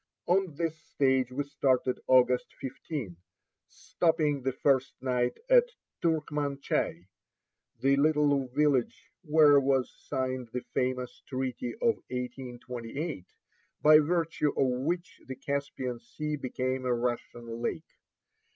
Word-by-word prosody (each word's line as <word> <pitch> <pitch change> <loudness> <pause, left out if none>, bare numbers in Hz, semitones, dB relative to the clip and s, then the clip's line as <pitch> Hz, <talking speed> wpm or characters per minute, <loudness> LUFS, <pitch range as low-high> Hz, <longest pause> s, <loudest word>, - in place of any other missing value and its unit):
On 180 -3 +1
this 165 0 -1
stage 130 -5 +1
we 140 +3 -1
started 130 -2 +1
August 125 -1 +3
15, 135 - -5 0.5
stopping 155 -4 0
the 130 +1 0
first 135 0 +1
night 125 -1 0
at - - +6 0.4
Turkmanchai, 145 - -1 0.8
the 135 +1 +4
little 145 -2 +3
village 135 -1 0
where 150 -3 +6
was 135 -2 +1
signed 130 -3 -2
the 125 - -3
famous 125 -1 -2
treaty 130 -2 -3
of 230 -1 +1
1828 125 - -5 0.6
by 155 0 +9
virtue 165 -1 +1
of 125 -1 +2
which 175 +3 -3
the 130 - -5
Caspian 135 -2 -3
Sea 150 +6 -4
became 130 -1 -2
a 125 -1 +2
Russian 120 -1 -4
lake. - - -2
135 Hz, 115 wpm, -29 LUFS, 125-150 Hz, 0.8 s, by